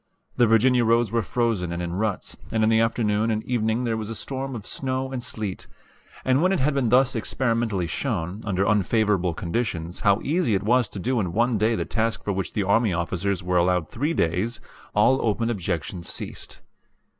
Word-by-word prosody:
The 120 - +4
Virginia 120 +3 +4
roads 115 -1 +2
were 115 0 +1
frozen 110 -5 -1
and 85 - -3
in 85 -1 -3
ruts, 105 +1 -2 0.2
and 110 -1 +1
in 110 - +4
the 110 0 +4
afternoon 115 -1 +1
and 110 -1 -1
evening 115 -1 0
there 115 -2 0
was 110 -1 -4
a 115 - -4
storm 135 +2 -5
of 105 -4 -7
snow 130 0 -3
and 130 -2 -3
sleet; 110 -6 -4 0.6
and 130 +2 +3
when 185 +2 +3
it 190 - +1
had 145 +3 +2
been 135 -4 +1
thus 130 +2 +4
experimentally 115 -4 -1
shown, 95 -1 -3
under 100 -1 0
unfavorable 105 -3 +2
conditions, 85 -3 -3
how 100 -2 +3
easy 155 - +1
it 95 - -1
was 120 0 +2
to - - -9
do 125 +6 0
in 90 -5 -2
one 115 +1 +2
day 110 +2 +2
the - - -2
task 115 0 -1
for 100 - -1
which 95 -1 -3
the 105 - 0
army 105 +2 +2
officers 90 +2 -1
were 90 0 +1
allowed 90 -1 +2
three 150 +7 -1
days, 90 +8 0 0.4
all 120 +6 +4
open 115 +1 0
objection 90 -3 -3
ceased. - - -7
110 Hz, 200 wpm, -24 LUFS, 95-120 Hz, 0.6 s, The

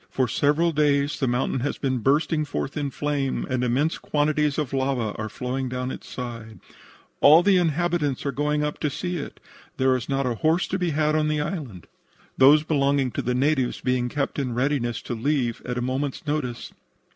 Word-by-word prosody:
For 130 -1 0
several 150 +8 +2
days 145 -1 +1
the 135 - +1
mountain 125 +2 0
has 145 +4 -2
been 130 -2 -1
bursting 150 +5 +2
forth 145 -1 -4
in 145 -2 -2
flame 140 -1 -2
and 130 -2 -1
immense 135 +6 +1
quantities 150 -1 0
of 145 -4 -2
lava 130 -5 0
are 110 0 -4
flowing 125 +4 -3
down 125 +1 -3
its - - -9
sides. 115 -3 -7 0.6
"All 160 +4 +7
the 195 -1 +4
inhabitants 165 -4 0
are 140 - 0
going 150 +1 0
up 150 0 -3
to 150 - 0
see 175 +5 -3
it. 145 - -7 0.4
There 130 0 +3
is 125 - -4
not 135 0 0
a 125 - 0
horse 160 - +1
to 190 - -1
be 180 -1 0
had 155 0 +1
on 155 -1 +2
the 155 0 0
island, 150 - -5 0.5
those 145 +3 +6
belonging 140 -4 +1
to - - -2
the 125 0 -1
natives 135 -1 +1
being 125 -1 0
kept 140 +2 -2
in 125 -4 -2
readiness 125 -2 -1
to - - -4
leave 120 0 -1
at 125 -1 -3
a 125 - -1
moment's 135 +4 -3
notice. 145 -5 -3
140 Hz, 195 wpm, -24 LUFS, 125-150 Hz, 0.6 s, All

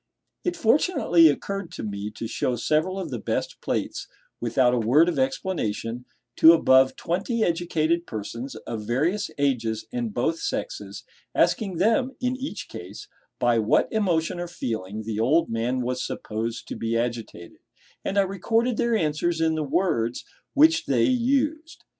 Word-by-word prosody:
It 355 -1 -1
fortunately 225 - +4
occurred 195 +4 -2
to - - -6
me 100 -1 -4
to 110 - -7
show 120 +2 -1
several 155 - 0
of 170 -6 -5
the 120 - -3
best - - -3
plates, - - -3 0.3
without 125 +1 +2
a 125 - +2
word 130 +9 +4
of 175 - 0
explanation, 125 - -2 0.3
to 165 - +9
above 130 -5 +4
twenty 210 +7 -1
educated 170 -1 0
persons 115 +4 -6
of 110 -2 -6
various 165 - 0
ages 115 -6 0
and 240 -2 -2
both 165 -5 -1
sexes, - - -4 0.3
asking 195 -6 +1
them, 230 +8 +2
in 250 0 0
each 265 +2 -6
case, 415 - -9 0.3
by 120 -2 +2
what 110 - +2
emotion 175 -5 0
or 175 - -3
feeling 110 - -4
the 110 -1 -4
old 145 +8 +2
man 120 +3 -1
was 125 +1 -2
supposed 115 +2 -4
to - - -4
be 115 0 -1
agitated; 115 -7 -4 0.4
and 195 - -2
I - - +7
recorded 225 +5 0
their 235 -1 +2
answers 160 -1 0
in 160 0 +2
the 155 - -1
words 125 -7 0 0.3
which 320 +3 +5
they 125 -4 +2
used. 280 +6 0
160 Hz, 155 wpm, -25 LUFS, -, 0.4 s, to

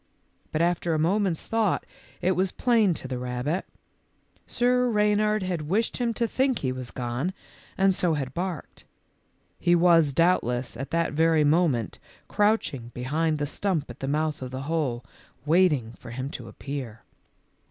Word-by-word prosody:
But 160 +2 +1
after 175 -1 +1
a - - +1
moment's 180 +2 +1
thought 225 -4 0 0.4
it 185 - +3
was 185 +1 +1
plain 225 -8 +2
to 130 - -6
the 130 -1 -4
rabbit. 125 +8 -2 0.8
Sir 250 0 +2
Rey 210 -2 +3
nard 210 0 +1
had 170 -5 -3
wished 220 +5 +1
him 240 -2 0
to 235 - 0
think 260 +1 +1
he - - +1
had 130 -1 -6
gone, 125 +8 -2 0.4
and 195 0 +4
so 175 -3 +1
had 135 -3 -4
barked. 175 -3 -5 0.8
He 175 -1 +3
was, 170 -4 +5
doubtless, 130 -7 +1
at 135 +4 -5
that 170 -2 0
very 160 0 +3
moment 145 - +1 0.3
crouching 205 - +1
behind 155 +5 0
the 145 - -1
stump 160 -2 -2
at 120 - -13
the 135 - -4
mouth 150 +1 -1
of 130 - -5
the 130 +1 -5
hole, 140 -6 -1 0.4
waiting 150 -8 +3
for 120 - -13
him 130 +4 -5
to 120 - -7
appear. 120 -1 -6
160 Hz, 165 wpm, -26 LUFS, 130-190 Hz, 0.8 s, was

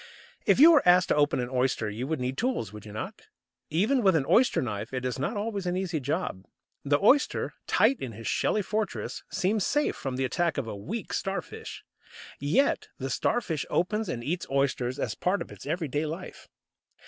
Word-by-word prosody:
If - - +5
you 320 +4 +10
were 305 -5 +6
asked 180 +1 +5
to - - +3
open 145 -2 +2
an 125 0 -3
oyster 125 -3 +1
you 110 +5 -4
would 160 -1 -1
need 125 +1 -2
tools, 230 - -1
would 105 0 -10
you - - -9
not? 110 +1 -7 0.4
Even 215 - +2
with 190 -5 +4
an 145 -4 +2
oyster 250 +2 +4
knife 105 -3 -3
it 130 0 -3
is 125 +1 -2
not 170 - -1
always 205 -3 -3
an 180 +1 0
easy 185 -4 -1
job. 140 - -2 0.4
The 145 +1 +2
oyster, 275 +8 +3
tight 270 - +3
in 120 -3 -5
his 115 +2 -10
shelly 210 - +1
fortress, 215 0 -3
seems 200 +2 0
safe 295 +8 +1
from 135 -2 -4
the 130 +1 0
attack 165 +6 0
of 135 - -1
a 110 - -5
weak 185 - -5
Starfish. 195 -3 -4 0.6
Yet 155 - +2
the 135 0 -4
Starfish 170 - 0
opens 210 +3 0
and 120 -7 -3
eats 170 +7 -2
oysters 135 -2 0
as 110 - -2
part 185 - 0
of - - -7
its - - -11
everyday 155 -2 -1
life. 165 +5 -7
155 Hz, 195 wpm, -28 LUFS, 130-200 Hz, 0.6 s, you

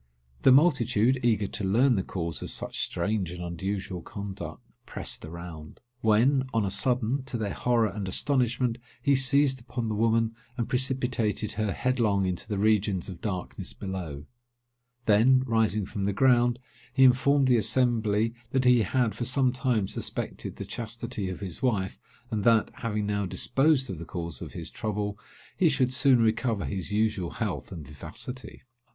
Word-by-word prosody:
The 130 - +6
multitude, 130 -4 +4
eager 110 -3 +2
to 100 - 0
learn 120 +8 +3
the 100 - +1
cause 85 -6 -4
of - - -5
such - - -4
strange 105 -4 -1
and 90 0 -6
unusual 95 +1 -4
conduct, 100 +2 -7 0.2
pressed - - -3
around; 80 -1 -9 0.2
when, 120 +5 +3
on 110 -2 +2
a 95 - -1
sudden, 125 +5 +1
to 135 -3 -4
their 105 -3 -2
horror 120 -2 +2
and 100 -2 -5
astonishment, 120 +2 +1 0.2
he 140 +3 +2
seized 135 0 +4
upon 120 -1 -4
the - - -1
woman, 115 +1 +2 0.2
and 120 -2 -1
precipitated 125 -5 0
her 110 -1 -1
headlong 110 -4 +1
into 90 -2 -3
the 105 - -2
regions 105 -3 +1
of 90 - -9
darkness 95 -4 -4
below; 85 -7 -6 0.8
then, 125 +5 +5
rising 110 -4 +1
from 100 0 -4
the 100 - 0
ground, 120 +1 +3 0.3
he 130 +2 +3
informed 135 +2 +5
the 125 -2 +4
assembly, 115 -1 +1 0.2
that 130 +1 0
he 125 -2 +6
had 115 +2 +1
for 120 - -4
some 130 +1 +2
time 120 -5 0
suspected - - -4
the - - -6
chastity 115 -3 -4
of 95 - -6
his 95 0 -6
wife, 105 -7 0 0.3
and 105 -2 -1
that, 115 -1 +4
having 105 -2 -2
now 100 -1 -1
disposed 135 - +2
of 95 -8 -6
the 85 - -7
cause 85 -6 -6
of - - -7
his - - -5
trouble, 105 -1 -3 0.4
he 175 - +4
should 130 -3 +1
soon 130 -1 +4
recover 110 -1 0
his 95 0 -3
usual 105 -4 0
health - - -4
and 80 -5 -7
vivacity. 125 - -7
110 Hz, 165 wpm, -27 LUFS, 100-125 Hz, 0.8 s, The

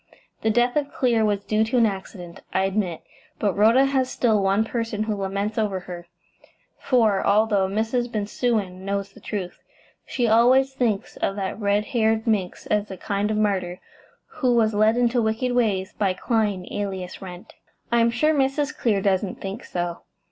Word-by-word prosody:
The 220 - +1
death 240 +3 +2
of 285 -1 -1
Clear 235 -4 +1
was 205 -2 0
due 215 +1 +1
to 235 +3 0
an 235 - +5
accident, 190 -4 -6
I 190 - +1
admit; 195 -3 -1 0.3
but 205 -3 0
Rhoda 230 +6 +5
has 265 -2 +1
still 220 -6 +1
one 195 +2 +2
person 225 -2 -2
who 215 -1 -2
laments 200 +2 -2
over 200 -4 -1
her, 175 -1 -9 0.7
for, 225 -7 +2
although 205 -2 +3
Mrs. 225 +4 -1
Bensusan 205 -3 -2
knows 200 0 -3
the - - -15
truth, 185 -4 -5 0.4
she 240 -2 -1
always 255 +4 +4
thinks 235 -5 -1
of 195 - -1
that 195 +1 -4
red 205 0 +1
haired 220 -1 +2
minx 205 -6 -1
as 210 0 0
a 190 - -7
kind 200 +1 -2
of 215 - 0
martyr, 190 -4 0 0.5
who 255 -5 0
was 220 -2 +3
led 215 +2 +3
into 245 0 +2
wicked 225 +3 0
ways 210 -6 0
by 195 -3 0
Clyne, 205 -5 -1
alias 190 -3 -4
Wrent." 180 -2 -10 0.4
"I 235 - +4
am 230 0 +4
sure 305 +7 +2
Mrs. 285 +1 0
Clear 205 -5 0
doesn't 190 -1 0
think 195 +4 -6
so." 175 -1 -4
215 Hz, 175 wpm, -23 LUFS, 195-235 Hz, 0.7 s, an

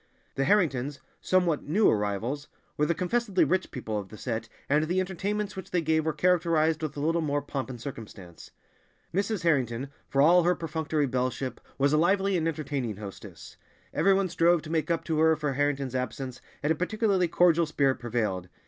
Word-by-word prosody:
The 135 - 0
Harringtons—somewhat 155 +1 0
new 205 +7 +4
arrivals—were 115 +8 -2
the 170 - +1
confessedly 195 0 +1
rich 180 +5 0
people 110 -4 -4
of 95 -2 -8
the 110 - -11
set, 115 -1 -4 0.2
and 150 +2 +2
the 180 +4 0
entertainments 200 +3 -2
which 190 - -7
they 180 - +1
gave 160 0 +1
were - - +3
characterized 165 -1 +2
with 150 -2 -4
a - - -3
little 165 +3 +1
more 145 -2 -1
pomp 135 -2 -4
and 125 -2 -7
circumstance. 105 - -9 0.6
Mrs. 200 0 -1
Harrington, 135 -5 +1 0.2
for 135 - -1
all 170 +5 +6
her 175 +1 +2
perfunctory 160 -2 -1
belleship, 130 -1 -2 0.2
was 140 +1 +2
a 150 - +4
lively 195 +3 +2
and 165 -2 +1
entertaining 145 -8 -3
hostess. 100 -2 -10 0.4
Everyone 195 0 +3
strove 170 -1 +3
to 155 - -7
make 165 +1 0
up 165 -1 0
to 160 -2 -1
her 160 0 +5
for 150 -2 -2
Harrington's 140 -2 -1
absence, 130 0 -4 0.2
and 150 - +2
a - - +3
particularly 195 +1 +1
cordial 170 -1 +3
spirit 140 -4 +1
prevailed. 110 -7 -2
155 Hz, 175 wpm, -28 LUFS, 130-175 Hz, 0.6 s, all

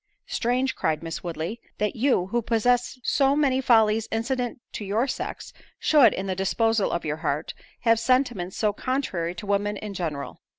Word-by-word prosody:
"Strange," 255 +2 0
cried 155 0 -1
Miss 165 0 -5
Woodley, 170 +6 -4 0.2
"that 210 -1 -1
you, 240 -6 +2
who 240 - +1
possess 245 +3 +1
so 275 +1 +3
many 270 -3 +2
follies 225 -3 +4
incident 245 +2 -2
to - - -5
your 210 +5 +1
sex, - - -5 0.2
should, 280 -8 +5
in 190 - -3
the 190 - -1
disposal 220 +3 +1
of 170 - -2
your 155 0 -2
heart, 150 0 -2 0.3
have 230 -1 +4
sentiments 240 -7 +1
so 210 -2 +1
contrary 200 -10 -2
to 180 - -7
women 205 +1 0
in 210 0 -6
general." 160 -7 -4
220 Hz, 170 wpm, -25 LUFS, 185-245 Hz, 0.3 s, should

